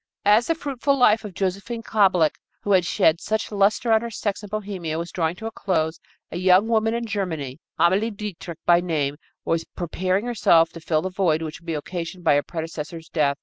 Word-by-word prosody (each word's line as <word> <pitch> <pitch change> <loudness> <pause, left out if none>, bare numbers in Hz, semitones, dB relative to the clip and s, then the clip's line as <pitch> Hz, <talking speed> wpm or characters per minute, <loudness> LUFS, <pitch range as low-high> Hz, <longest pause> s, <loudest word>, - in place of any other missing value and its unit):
As 210 +3 +5
the 330 - +1
fruitful 280 -3 -1
life 225 -4 +4
of 205 -4 -8
Josephine 200 +5 -3
Kablick 185 -8 +3 0.2
who 205 - -1
had 180 -3 +4
shed 160 +2 +3
such 220 0 -2
luster 205 +3 +2
on 220 0 +5
her 235 - -4
sex 205 -3 -3
in 205 - -9
Bohemia 195 -6 -4
was 170 +1 -4
drawing 165 -1 -1
to 220 - -9
a 225 - -3
close, 165 -6 -1 0.3
a 170 - -4
young 185 +3 +4
woman 225 0 +2
in 235 0 -2
Germany, 165 - -3 0.2
Amalie 190 +6 +3
Dietrich 200 -6 -7
by 175 0 +5
name, 150 -5 -1 0.3
was 165 0 0
preparing 185 +4 -1
herself 170 -9 +4
to 165 - -9
fill 155 -1 0
the 185 - -3
void 175 -4 +1
which 155 +1 -6
would 170 - -20
be 165 - -1
occasioned 175 +3 -5
by - - +4
her 145 - +3
predecessor's 160 0 -6
death. 140 -3 +1
185 Hz, 205 wpm, -23 LUFS, 165-215 Hz, 0.3 s, As